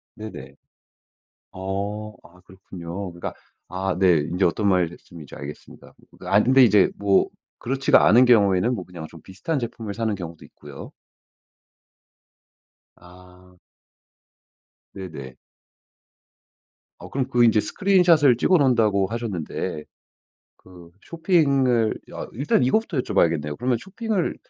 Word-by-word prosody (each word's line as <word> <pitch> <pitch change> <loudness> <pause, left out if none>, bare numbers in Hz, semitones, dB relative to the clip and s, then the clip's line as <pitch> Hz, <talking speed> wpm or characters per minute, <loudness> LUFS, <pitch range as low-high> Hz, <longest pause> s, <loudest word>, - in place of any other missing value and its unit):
네네. 70 -11 -10 1.0
어. 100 +3 -5
아 90 +2 -19
그렇군요. 90 0 -8
그러니까 85 - -7 0.3
아 95 +2 -3
네 90 -4 +4
인제 85 +6 -1
어떤 100 +4 +1
말씀인지 85 -4 -3
알겠습니다. 70 +1 -11 0.3
아 105 +2 +3
근데 130 +1 +5
이제 105 -4 +4
뭐 100 -1 +2 0.3
그렇지가 135 +2 +2
않은 120 +7 +6
경우에는 105 -1 +3
뭐 95 -6 -6
그냥 85 -3 -9
좀 85 -1 -14
비슷한 100 - -4
제품을 115 -4 -6
사는 110 -1 -2
경우도 85 -4 -9
있고요. 75 -2 -12 2.1
아. 90 0 -19 1.3
네네. 75 -9 -9 1.6
어 - - -12
그럼 130 -1 -2
그 120 -2 +3
이제 110 -2 +4
스크린 190 - +1
샷을 150 -7 +5
찍어 180 +7 +3
놓는다고 110 -8 +2
하셨는데 100 -9 -5 0.7
그 90 -2 -16
쇼핑을 140 - +1
여 - - -7
일단 135 +1 0
이거부터 170 - 0
여쭤 125 - -3
봐야겠네요. 75 -3 +1
그러면 125 +1 0
쇼핑을 195 - -3
100 Hz, 265 characters per minute, -23 LUFS, 90-125 Hz, 2.1 s, 않은